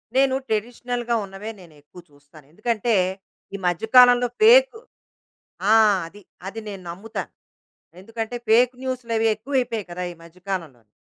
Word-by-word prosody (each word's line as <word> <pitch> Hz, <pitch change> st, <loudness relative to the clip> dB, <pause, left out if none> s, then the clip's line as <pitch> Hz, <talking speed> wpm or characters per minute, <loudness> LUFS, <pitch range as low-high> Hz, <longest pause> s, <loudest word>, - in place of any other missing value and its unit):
నేను 265 Hz, 0 st, +3 dB
ట్రెడిషనల్‌గా 240 Hz, +2 st, -2 dB
ఉన్నవే, 195 Hz, +3 st, -8 dB
నేనెక్కువ 155 Hz, 0 st, -16 dB
చూస్తాను. 145 Hz, +1 st, -19 dB
ఎందుకంటే, 225 Hz, +4 st, -1 dB, 0.6 s
ఈ -, -, -3 dB
మధ్య 175 Hz, +4 st, -1 dB
కాలంలో 245 Hz, 0 st, +7 dB
ఫేకు, 480 Hz, +1 st, +6 dB, 0.9 s
ఆ! -, -, +7 dB, 0.3 s
అది. 205 Hz, +5 st, -14 dB, 0.3 s
అది 225 Hz, +3 st, -7 dB
నేను 195 Hz, -2 st, -8 dB
నమ్ముతా. 205 Hz, +6 st, -6 dB, 0.8 s
ఎందుకంటే, 225 Hz, +2 st, -5 dB
ఫేక్ 240 Hz, +3 st, +5 dB
న్యూసులవి 235 Hz, -4 st, -2 dB
ఎక్కువైపోయి 235 Hz, -2 st, -2 dB
కదా! 180 Hz, +1 st, -5 dB
ఈ -, -, -13 dB
మధ్య 170 Hz, +2 st, -16 dB
కాలంలోని. 140 Hz, -, -6 dB
225 Hz, 125 wpm, -23 LUFS, 180-245 Hz, 0.9 s, కాలంలో